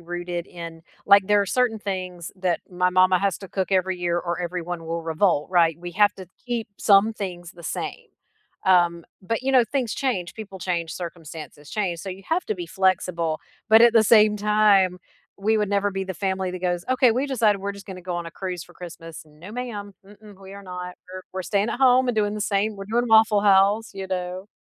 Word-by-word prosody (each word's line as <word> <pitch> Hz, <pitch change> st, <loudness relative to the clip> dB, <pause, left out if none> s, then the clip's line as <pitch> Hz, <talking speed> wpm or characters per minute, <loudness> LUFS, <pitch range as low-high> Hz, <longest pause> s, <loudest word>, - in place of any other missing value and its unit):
rooted 175 Hz, 0 st, -5 dB
in 165 Hz, -2 st, -9 dB, 0.2 s
like, 200 Hz, -1 st, +6 dB
there 205 Hz, 0 st, +4 dB
are -, -, -4 dB
certain 240 Hz, +1 st, +1 dB
things 185 Hz, -4 st, -5 dB
that 185 Hz, -2 st, -1 dB
my 180 Hz, 0 st, +1 dB
mama 185 Hz, 0 st, +4 dB
has 195 Hz, -1 st, 0 dB
to 195 Hz, -, -10 dB
cook 190 Hz, 0 st, -2 dB
every 185 Hz, -1 st, +1 dB
year 175 Hz, -1 st, 0 dB
or 175 Hz, 0 st, -3 dB
everyone 175 Hz, -1 st, -4 dB
will 165 Hz, 0 st, -3 dB
revolt, 160 Hz, -1 st, +1 dB
right? 165 Hz, -3 st, +3 dB
We 175 Hz, 0 st, -7 dB
have 205 Hz, +2 st, +3 dB
to 185 Hz, -2 st, -11 dB, 0.2 s
keep 235 Hz, -3 st, -3 dB
some 205 Hz, +2 st, +5 dB
things 180 Hz, -4 st, -6 dB
the 170 Hz, -, -14 dB
same, -, -, -5 dB, 0.6 s
um, 175 Hz, -3 st, +3 dB, 0.2 s
but 225 Hz, +5 st, -3 dB
you 270 Hz, +1 st, 0 dB
know, 250 Hz, -2 st, +6 dB
things 255 Hz, -6 st, -1 dB
change, 205 Hz, -11 st, -2 dB
people 205 Hz, -3 st, -9 dB
change, 170 Hz, -3 st, -2 dB
circumstances 160 Hz, -4 st, -9 dB
change, 185 Hz, -6 st, -2 dB
so 195 Hz, -, -7 dB
you 190 Hz, +1 st, -7 dB
have 355 Hz, +3 st, +1 dB
to 215 Hz, -, -1 dB
be 175 Hz, -3 st, -6 dB
flexible, 170 Hz, -3 st, 0 dB, 0.3 s
but 220 Hz, +1 st, +7 dB
at 235 Hz, -1 st, +7 dB
the 225 Hz, -1 st, +6 dB
same 215 Hz, -1 st, +5 dB
time, 205 Hz, -3 st, +3 dB, 0.4 s
we 220 Hz, +3 st, +1 dB
would 210 Hz, -2 st, 0 dB
never 200 Hz, 0 st, +1 dB
be 195 Hz, 0 st, -3 dB
the 190 Hz, -, -4 dB
family 190 Hz, 0 st, -2 dB
that 185 Hz, -, -5 dB
goes, 175 Hz, -1 st, -1 dB
"Okay, 255 Hz, -1 st, +4 dB
we 260 Hz, +4 st, 0 dB
decided 220 Hz, -7 st, +2 dB
we're 200 Hz, +1 st, -3 dB
just 200 Hz, 0 st, -12 dB
gonna 185 Hz, -3 st, -8 dB
go 180 Hz, -1 st, -4 dB
on 170 Hz, -1 st, -4 dB
a 165 Hz, -, -7 dB
cruise 180 Hz, -3 st, -5 dB
for 175 Hz, -, -19 dB
Christmas." 165 Hz, -2 st, -10 dB
No, 155 Hz, +5 st, -13 dB
ma'am. 210 Hz, -5 st, -6 dB
Mm-mm, 205 Hz, -1 st, -16 dB
we 195 Hz, 0 st, -11 dB
are 200 Hz, -, -10 dB
not. 180 Hz, -1 st, -7 dB, 0.2 s
We're 185 Hz, -, -7 dB
we're 185 Hz, -, -4 dB
staying 200 Hz, +4 st, 0 dB
at -, -, -4 dB
home 255 Hz, -1 st, +4 dB
and 245 Hz, -, +1 dB
doing 210 Hz, -1 st, 0 dB
the 210 Hz, -, -5 dB
same 210 Hz, +1 st, 0 dB
we're 195 Hz, -, -7 dB
doing 240 Hz, +3 st, 0 dB
Waffle 220 Hz, -2 st, +5 dB
House," 205 Hz, +2 st, +4 dB
you 195 Hz, -1 st, -5 dB
know? 185 Hz, +1 st, -4 dB
190 Hz, 220 wpm, -24 LUFS, 175-210 Hz, 0.6 s, but